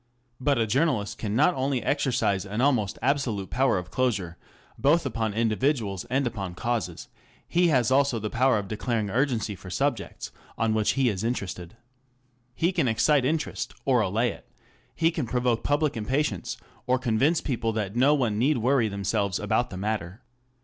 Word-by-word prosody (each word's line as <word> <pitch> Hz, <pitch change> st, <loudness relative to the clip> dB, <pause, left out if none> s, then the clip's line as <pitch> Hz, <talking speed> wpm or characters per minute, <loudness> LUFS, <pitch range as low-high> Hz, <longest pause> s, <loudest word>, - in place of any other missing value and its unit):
But 140 Hz, +1 st, +2 dB
a 115 Hz, -, +2 dB
journalist 125 Hz, -3 st, 0 dB
can 105 Hz, -1 st, -2 dB
not 150 Hz, +8 st, +4 dB
only 130 Hz, -2 st, -1 dB
exercise 125 Hz, -9 st, +1 dB
an 105 Hz, +2 st, -5 dB
almost 125 Hz, -8 st, +2 dB
absolute 125 Hz, -8 st, 0 dB
power 130 Hz, -4 st, +2 dB
of 90 Hz, -, -6 dB
closure 100 Hz, -10 st, -1 dB, 0.4 s
both 150 Hz, +4 st, +3 dB
upon 110 Hz, -4 st, -2 dB
individuals 115 Hz, -2 st, 0 dB
and 130 Hz, +3 st, 0 dB
upon 100 Hz, -7 st, -4 dB
causes, 110 Hz, -5 st, -3 dB, 0.4 s
he 175 Hz, +1 st, +3 dB
has 130 Hz, -7 st, +2 dB
also 135 Hz, -2 st, +3 dB
the 105 Hz, -1 st, -4 dB
power 130 Hz, 0 st, +3 dB
of 100 Hz, -1 st, -3 dB
declaring 110 Hz, -1 st, -2 dB
urgency 115 Hz, -3 st, 0 dB
for 95 Hz, -, -11 dB
subjects -, -, -2 dB, 0.3 s
on 115 Hz, -1 st, +1 dB
which 110 Hz, -1 st, +2 dB
he 135 Hz, -2 st, +2 dB
is 100 Hz, -2 st, -3 dB
interested. 100 Hz, -5 st, -4 dB, 0.8 s
He 170 Hz, +3 st, +1 dB
can 165 Hz, -8 st, +1 dB
excite 130 Hz, +4 st, +3 dB
interest, 155 Hz, +3 st, -2 dB
or 125 Hz, -4 st, +3 dB
allay 110 Hz, +4 st, +1 dB
it; -, -, -14 dB, 0.5 s
he 165 Hz, 0 st, +2 dB
can 155 Hz, -7 st, -3 dB
provoke 125 Hz, -1 st, 0 dB
public 145 Hz, 0 st, +1 dB
impatience, 115 Hz, -, -1 dB, 0.3 s
or 130 Hz, +1 st, +3 dB
convince 130 Hz, +7 st, +2 dB
people 115 Hz, -4 st, -1 dB
that 105 Hz, -1 st, -3 dB
no 135 Hz, +5 st, +4 dB
one 115 Hz, -7 st, 0 dB
need 140 Hz, +4 st, +3 dB
worry 120 Hz, 0 st, +2 dB
themselves 100 Hz, -1 st, -1 dB
about -, -, 0 dB
the 95 Hz, -, -7 dB
matter. 100 Hz, -1 st, -3 dB
120 Hz, 170 wpm, -26 LUFS, 105-135 Hz, 0.8 s, not